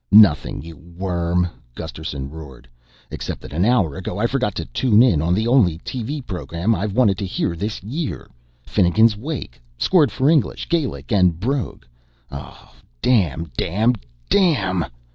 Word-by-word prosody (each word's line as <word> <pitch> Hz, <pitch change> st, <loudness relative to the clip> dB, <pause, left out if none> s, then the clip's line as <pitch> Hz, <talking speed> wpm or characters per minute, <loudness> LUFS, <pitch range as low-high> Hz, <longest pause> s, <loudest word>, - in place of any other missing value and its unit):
"Nothing, 100 Hz, -8 st, +5 dB
you 80 Hz, 0 st, -10 dB
worm!" 85 Hz, 0 st, -1 dB, 0.3 s
Gusterson 70 Hz, -3 st, -6 dB
roared, 70 Hz, -6 st, -11 dB, 0.4 s
"Except -, -, -5 dB
that -, -, -10 dB
an 85 Hz, +4 st, +1 dB
hour 100 Hz, -, +2 dB
ago -, -, -5 dB
I -, -, +1 dB
forgot -, -, 0 dB
to -, -, -3 dB
tune 110 Hz, -, +3 dB
in 90 Hz, -13 st, +3 dB
on 85 Hz, +3 st, +1 dB
the 110 Hz, +3 st, 0 dB
only 115 Hz, -10 st, +4 dB
TV 130 Hz, -, -5 dB
program 90 Hz, +1 st, -1 dB
I've 100 Hz, +1 st, -2 dB
wanted 105 Hz, -6 st, +3 dB
to 100 Hz, -, -2 dB
hear 85 Hz, -2 st, -1 dB
this 105 Hz, +3 st, -4 dB
year 140 Hz, +8 st, -4 dB, 0.4 s
Finnegans 105 Hz, +5 st, +3 dB
Wake 105 Hz, -, -6 dB, 0.2 s
scored 150 Hz, -, +3 dB
for 130 Hz, +6 st, 0 dB
English, 155 Hz, -3 st, +2 dB
Gaelic 160 Hz, -9 st, -1 dB
and 90 Hz, -5 st, +3 dB
brogue. 130 Hz, +5 st, -2 dB, 0.5 s
Oh, 70 Hz, -2 st, -10 dB, 0.3 s
damn 85 Hz, -, +1 dB
damn 110 Hz, -, +1 dB, 0.3 s
DAMN!" 100 Hz, -, +2 dB
95 Hz, 150 wpm, -21 LUFS, 85-125 Hz, 0.5 s, Nothing